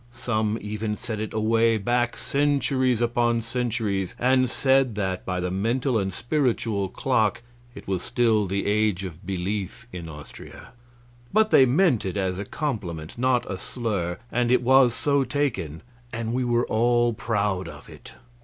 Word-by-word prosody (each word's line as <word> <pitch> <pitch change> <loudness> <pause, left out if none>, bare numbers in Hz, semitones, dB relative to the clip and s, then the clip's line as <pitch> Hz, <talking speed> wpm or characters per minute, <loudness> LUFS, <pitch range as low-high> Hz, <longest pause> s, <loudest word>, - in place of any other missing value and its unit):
Some 110 -3 -1
even 105 +1 -3
set 115 -3 -5
it 110 -1 -4
away 115 +1 +2
back 120 +3 0
centuries 135 -4 +1
upon 120 -1 +1
centuries 115 -6 -2
and 130 0 +3
said 135 -4 +2
that 95 -3 -3
by 90 -1 -1
the 90 0 -2
mental 115 +5 0
and 95 -1 -1
spiritual 115 -5 -1
clock 110 -2 0 0.3
it - - -11
was 95 -2 -1
still 110 -3 +1
the 100 +2 -2
Age 105 -2 +1
of 90 -1 -8
Belief 100 +4 -3
in 85 -2 -6
Austria. 75 -2 -11 0.6
But 215 +1 +3
they 130 - +7
meant 135 - +3
it 95 +1 -3
as 95 -1 -1
a 100 - -4
compliment, 95 - -4
not 125 0 +1
a 95 - -5
slur, 100 -9 -3
and 120 0 +1
it 125 - +3
was 130 -1 +5
so 140 -1 +2
taken, 120 - -2 0.3
and 115 0 -3
we 130 +1 0
were 120 0 +1
all 120 +1 +2
proud 100 -5 -1
of - - -11
it. - - -13
115 Hz, 160 wpm, -25 LUFS, 100-125 Hz, 0.6 s, they